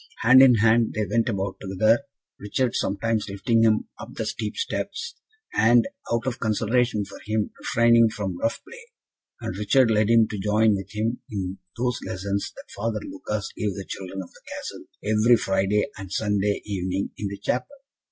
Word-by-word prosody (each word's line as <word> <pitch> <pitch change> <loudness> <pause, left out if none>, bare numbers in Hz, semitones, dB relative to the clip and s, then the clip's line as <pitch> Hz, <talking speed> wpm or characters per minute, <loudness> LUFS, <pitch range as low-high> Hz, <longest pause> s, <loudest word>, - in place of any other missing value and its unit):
Hand 130 +3 +8
in 130 -2 +8
hand 115 +1 +3
they 105 0 0
went 115 +3 +1
about 100 -2 -2
together, 110 +4 +3 0.4
Richard 115 +4 -1
sometimes 105 +2 -1
lifting 115 +4 +1
him 110 -1 +3
up - - -9
the - - -3
steep - - -4
steps, 460 +1 -3 0.4
and, 120 +1 +5 0.2
out 115 0 0
of 130 -2 -2
consideration 115 0 +1
for 100 - -11
him, 110 0 -1
refraining 115 -1 +4
from 95 -5 -4
rough 115 - -1
play; 475 0 -11 0.6
and 90 - -4
Richard 115 +4 +3
led 105 0 +2
him 115 -1 +5
to 105 - -4
join 105 +2 +3
with 95 -1 -4
him 115 +3 -2
in 95 -3 -4 0.2
those 125 +1 0
lessons 100 +2 -3
that - - -11
Father 110 +1 -2
Lucas 105 +1 -4
gave 105 -4 -2
the 100 - -6
children 95 0 -6
of 90 - -15
the - - -19
Castle, - - -7 0.2
every 110 +3 +4
Friday 95 +1 +1
and 95 -1 -9
Sunday 105 -1 0
evening 95 -1 -2
in 105 - -2
the 100 0 -6
Chapel. 125 - -1
105 Hz, 175 wpm, -25 LUFS, 100-115 Hz, 0.6 s, Hand